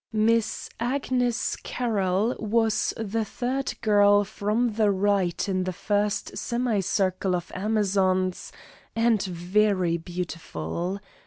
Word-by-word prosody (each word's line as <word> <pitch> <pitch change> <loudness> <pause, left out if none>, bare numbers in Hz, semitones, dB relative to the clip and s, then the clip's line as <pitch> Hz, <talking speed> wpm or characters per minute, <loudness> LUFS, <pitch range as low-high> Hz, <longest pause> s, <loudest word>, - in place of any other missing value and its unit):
Miss 220 0 +1
Agnes 245 -1 0
Carroll 215 -2 0
was 220 0 +1
the 225 0 -1
third 260 +5 -3
girl 205 -2 +5
from 215 +4 0
the 215 -1 +2
right 195 -3 +1
in 185 -2 0
the 185 - -2
first 205 +2 -1
semi 235 -3 0
circle 185 0 0
of 175 0 -5
amazons, 190 -2 0 0.4
and 230 -2 +3
very 185 0 +1
beautiful. 170 - -4
205 Hz, 105 wpm, -26 LUFS, 185-225 Hz, 0.4 s, girl